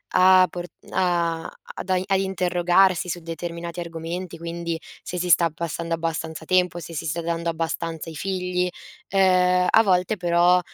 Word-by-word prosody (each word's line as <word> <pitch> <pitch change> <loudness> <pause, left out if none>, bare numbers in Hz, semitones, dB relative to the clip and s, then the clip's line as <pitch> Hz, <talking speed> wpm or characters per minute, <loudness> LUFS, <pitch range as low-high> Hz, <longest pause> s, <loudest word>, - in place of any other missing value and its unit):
a 185 0 +7
por 175 0 -6 0.3
a 170 -3 0 0.2
ad 190 - -7
ai 185 0 +2
a 195 - +2
interrogarsi 180 -1 +2
su 175 - -3
determinati 170 +1 -6
argomenti, 170 +1 -5
quindi 170 0 -4 0.2
se 180 - -6
si 180 0 -2
sta 170 -1 +5
passando 165 +1 -4
abbastanza 160 -1 -4
tempo, 180 -1 +2
se 170 - -9
si 160 - -4
sta 170 +3 -2
dando 170 0 -2
abbastanza 165 0 -3
ai 160 - -9
figli; 180 0 -1 0.4
ehm, 180 -1 +4
a 225 - +6
volte 185 +1 +2
però 175 +1 +4
175 Hz, 155 wpm, -24 LUFS, 165-180 Hz, 0.4 s, a